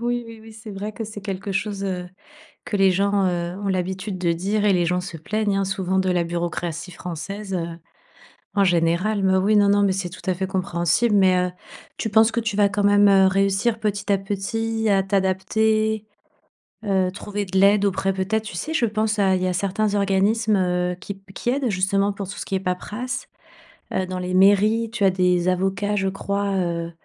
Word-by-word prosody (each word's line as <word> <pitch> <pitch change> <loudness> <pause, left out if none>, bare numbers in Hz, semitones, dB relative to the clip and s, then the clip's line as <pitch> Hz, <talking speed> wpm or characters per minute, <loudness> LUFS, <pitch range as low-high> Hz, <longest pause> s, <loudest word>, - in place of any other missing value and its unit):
Oui, 240 0 -1
oui, 225 -1 -11
oui, 225 0 -13
c'est 215 0 -10
vrai 205 +2 -5
que 220 +2 -5
c'est 210 -1 -8
quelque 195 0 -4
chose, 200 0 -2
heu, 180 -2 -3 0.6
que 205 - -2
les 195 -1 +4
gens, 200 +1 +1
heu, 175 0 -2
ont 200 -1 -3
l'habitude 190 +1 -2
de 175 -2 +1
dire 200 +5 -1
et 205 - +4
les 175 -1 +2
gens 180 +2 +1
se 180 -2 -7
plaignent, 205 +5 -1
hein, 195 - +1
souvent 190 0 -1
de 190 0 +1
la 175 -1 +1
bureaucratie 170 0 -4
française, 195 +4 -6
heu, 170 -1 -4 0.8
en 200 - +4
général. 180 +4 +1
Mais 190 0 +3
oui, 200 +3 +2
non, 205 -1 +4
non, 205 0 +4
mais 200 - +3
c'est 185 -1 -3
tout 175 - -11
à - - +3
fait 190 +2 -2
compréhensible, 190 +3 +1
mais, 190 -2 +4
heu, - - -12 0.5
tu 220 - -2
penses 220 +1 +5
que 235 - -1
tu 220 -2 -2
vas 205 -1 +4
quand 205 0 -1
même, 205 0 +5
heu, 195 -1 +6
réussir 195 +4 +1
petit 205 -1 -2
à 200 - +4
petit 220 +3 -2
à 195 -1 +3
t'adapter? 215 +3 +1 0.8
Heu, 190 -3 +1
trouver 205 +1 -4
de 190 0 -1
l'aide 200 +1 +5
auprès, 195 0 0
peut-être, 195 +3 -1
tu 195 -5 -7
sais 310 - -4
je 285 - +2
pense 215 0 -1
à 190 -2 +3
il 185 - -2
y - - +1
a - - 0
certains 200 +3 0
organismes, 205 +2 +2
heu, 180 -1 0
qui 200 - -6
p 195 0 -18
qui - - -4
aident 260 -2 0
justement 195 +1 +1
pour 195 -1 -6
tout 205 - -7
ce - - -4
qui 195 - -1
est - - -2
paperasse. 210 +7 -4 0.7
Heu, 190 - 0
dans 185 0 -4
les 180 0 -4
mairies 205 +4 +4
tu 230 -3 -2
as - - +6
des 180 -1 +1
avocats 195 +3 0
je 195 -1 0
crois, 200 +1 -2
heu 170 -2 -2
195 Hz, 215 wpm, -22 LUFS, 185-210 Hz, 0.8 s, heu